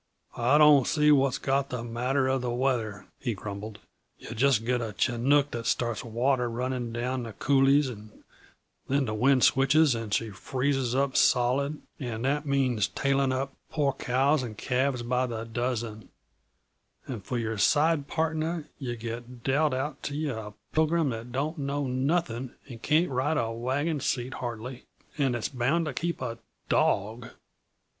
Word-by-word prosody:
"I 125 Hz, +5 st, +4 dB
don't 150 Hz, -4 st, +6 dB
see 150 Hz, -1 st, +4 dB
what's 135 Hz, -2 st, +3 dB
got 135 Hz, 0 st, 0 dB
the 125 Hz, -2 st, -4 dB
matter 125 Hz, +3 st, 0 dB
of 130 Hz, -1 st, +1 dB
the 125 Hz, -, -2 dB
weather," 120 Hz, -6 st, -1 dB
he 120 Hz, -5 st, -2 dB
grumbled. 100 Hz, +1 st, -7 dB, 0.4 s
"Yuh -, -, -8 dB
just 120 Hz, -1 st, +2 dB
get 125 Hz, 0 st, +1 dB
a 110 Hz, -3 st, -5 dB
chinook 135 Hz, +4 st, +2 dB
that 115 Hz, -1 st, -4 dB
starts 120 Hz, -3 st, 0 dB
water 125 Hz, +2 st, 0 dB
running 125 Hz, 0 st, -3 dB
down 125 Hz, +2 st, -2 dB
the 115 Hz, -2 st, -7 dB
coulées, 135 Hz, +3 st, +3 dB
and 110 Hz, -3 st, -10 dB, 0.6 s
then 140 Hz, 0 st, +1 dB
the 110 Hz, -, -3 dB
wind 130 Hz, +4 st, +3 dB
switches 140 Hz, +2 st, +5 dB
and 115 Hz, -2 st, -4 dB
she 110 Hz, +1 st, 0 dB
freezes 130 Hz, +4 st, -1 dB
up 135 Hz, 0 st, +1 dB
solid 135 Hz, +4 st, +2 dB, 0.2 s
and 120 Hz, -3 st, -4 dB
that 145 Hz, +2 st, 0 dB
means 130 Hz, -7 st, +2 dB
tailing 140 Hz, -1 st, +1 dB
up 135 Hz, +1 st, -2 dB, 0.2 s
poor 145 Hz, -3 st, +1 dB
cows 135 Hz, +3 st, +1 dB
and 115 Hz, -4 st, -6 dB
calves 130 Hz, -1 st, 0 dB
by 125 Hz, +1 st, 0 dB
the 115 Hz, -2 st, -4 dB
dozen 115 Hz, -2 st, -3 dB, 1.0 s
and 115 Hz, -7 st, -6 dB
for 125 Hz, -, -3 dB
your 110 Hz, -2 st, -2 dB
side 150 Hz, -, +3 dB
partner 160 Hz, 0 st, -1 dB
yuh 125 Hz, -4 st, -3 dB
get 120 Hz, +1 st, -7 dB
dealt 145 Hz, +3 st, +2 dB
out 135 Hz, +2 st, -3 dB
to 145 Hz, -, -4 dB
yuh 150 Hz, -4 st, -2 dB
a 105 Hz, -1 st, -7 dB, 0.2 s
pilgrim 160 Hz, -2 st, +2 dB
that 115 Hz, +1 st, -6 dB
don't 150 Hz, +5 st, -2 dB
know 140 Hz, +1 st, -1 dB
nothing 130 Hz, -1 st, -1 dB
and 120 Hz, -4 st, -10 dB
can't 155 Hz, +3 st, +2 dB
ride 140 Hz, +5 st, 0 dB
a 115 Hz, -6 st, 0 dB
wagon 135 Hz, +7 st, -1 dB
seat, 130 Hz, -1 st, -2 dB
hardly, 120 Hz, +1 st, -6 dB, 0.4 s
and 135 Hz, -4 st, +2 dB
that's 115 Hz, -, -2 dB
bound 140 Hz, +6 st, +1 dB
to 150 Hz, -, -3 dB
keep 170 Hz, +4 st, -3 dB
a 115 Hz, -2 st, -4 dB, 0.3 s
dawg! 110 Hz, +4 st, +1 dB
130 Hz, 165 wpm, -28 LUFS, 120-140 Hz, 1.0 s, don't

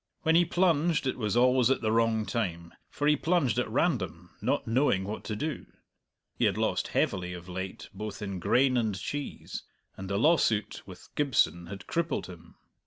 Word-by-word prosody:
When 160 Hz, -, +3 dB
he 175 Hz, +1 st, +5 dB
plunged 170 Hz, -3 st, +2 dB
it 130 Hz, -, 0 dB
was 110 Hz, -1 st, -1 dB
always 125 Hz, 0 st, +4 dB
at 135 Hz, -, +1 dB
the 110 Hz, -2 st, +1 dB
wrong 115 Hz, -1 st, +2 dB
time, 85 Hz, -8 st, -3 dB, 0.2 s
for 145 Hz, -, -3 dB
he 150 Hz, -, +5 dB
plunged 155 Hz, -, +1 dB
at -, -, -1 dB
random, -, -, -1 dB
not -, -, 0 dB
knowing 115 Hz, -5 st, +2 dB
what 105 Hz, +3 st, -5 dB
to 110 Hz, -, -3 dB
do. 150 Hz, +7 st, -4 dB, 0.7 s
He -, -, +3 dB
had -, -, +1 dB
lost -, -, 0 dB
heavily 90 Hz, -2 st, 0 dB
of 90 Hz, 0 st, -9 dB
late 95 Hz, +1 st, -6 dB
both 105 Hz, +1 st, -6 dB
in 100 Hz, -3 st, -4 dB
grain 130 Hz, +7 st, +3 dB
and 110 Hz, -5 st, 0 dB
cheese, 145 Hz, +7 st, -5 dB, 0.3 s
and 95 Hz, 0 st, -7 dB
the 100 Hz, -, 0 dB
lawsuit 110 Hz, -, +2 dB
with 95 Hz, -2 st, -12 dB
Gibson 110 Hz, -11 st, +1 dB
had 100 Hz, +2 st, -8 dB
crippled 170 Hz, 0 st, -1 dB
him. 85 Hz, -2 st, -13 dB
110 Hz, 180 wpm, -29 LUFS, 95-145 Hz, 0.7 s, he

